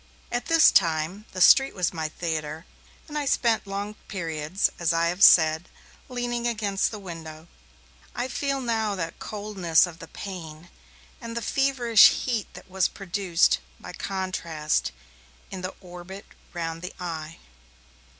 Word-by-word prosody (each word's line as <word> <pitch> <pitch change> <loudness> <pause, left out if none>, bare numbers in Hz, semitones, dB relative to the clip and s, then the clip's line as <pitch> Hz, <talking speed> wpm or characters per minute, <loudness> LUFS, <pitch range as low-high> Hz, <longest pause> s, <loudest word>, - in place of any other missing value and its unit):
At 245 0 -2
this 330 -1 +6
time, 170 +3 +1
the 185 - -5
street 270 +8 +6
was 180 -2 0
my 160 -2 -3
theatre, 160 -1 -4 0.4
and 300 - -9
I 285 - -3
spent 230 -5 +1
long 200 +1 -4
periods, 165 -1 -1
as 170 -1 +2
I 165 0 +2
have 180 +3 -4
said, 160 0 +6 0.4
leaning 240 -1 -2
against 210 -4 0
the 215 - -7
window. 165 -4 -9 0.7
I 245 - -2
feel 275 +1 -2
now 220 -4 0
that 165 -3 -5
coldness 200 -6 +1
of 170 -2 -10
the 165 - -10
pane, 170 -4 -8 0.5
and 230 0 -6
the - - -2
feverish 250 -4 +5 0.2
heat 235 -5 -2
that - - -12
was 190 -1 +1
produced, 190 -2 +1 0.2
by - - -9
contrast, 165 - -2 0.6
in 190 - -6
the 185 +1 -5
orbit 180 +2 -10 0.3
round 165 -1 -4
the 180 +2 -7
eye. 165 -3 -6
185 Hz, 145 wpm, -25 LUFS, 165-220 Hz, 0.7 s, this